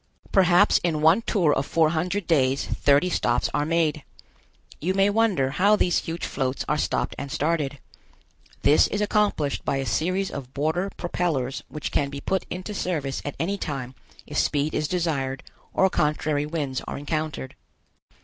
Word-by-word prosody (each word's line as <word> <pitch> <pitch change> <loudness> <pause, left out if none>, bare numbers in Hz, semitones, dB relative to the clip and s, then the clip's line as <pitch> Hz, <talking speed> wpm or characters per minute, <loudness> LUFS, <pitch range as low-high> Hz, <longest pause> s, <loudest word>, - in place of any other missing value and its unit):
Perhaps 185 +1 +5
in 160 -3 -1
one 165 +8 +5
tour 175 -9 +2
of 135 - 0
four 155 +2 +2
hundred 180 +4 -1
days 135 -5 +2
thirty 145 +4 +3
stops 120 -8 0
are 145 0 0
made. 160 -3 +1 0.8
You 185 +5 -1
may 195 +1 +4
wonder 200 -12 +2
how 200 +8 +4
these 180 -4 +2
huge 165 +1 -4
floats 130 -1 -2
are 150 - +1
stopped 150 - -1
and 140 - -6
started. 150 -2 -1 0.9
This 150 - +5
is 205 - -2
accomplished 205 -9 +1
by 140 - 0
a 135 - -2
series 185 +7 0
of 135 -2 -8
border 160 +7 0
propellors 155 -7 -1
which 150 - -5
can 140 - +1
be 140 0 -6
put 190 +6 -2
into 185 +4 -5
service 155 -9 -2
at 145 - -5
any 195 +4 -1
time 135 -4 -4 0.3
if - - -2
speed 145 +1 +1
is 150 - 0
desired 145 -7 -1 0.3
or 190 - +3
contrary 150 -3 0
winds 145 -5 -3
are - - -4
encountered. 150 -2 -3
155 Hz, 165 wpm, -25 LUFS, 140-180 Hz, 0.9 s, Perhaps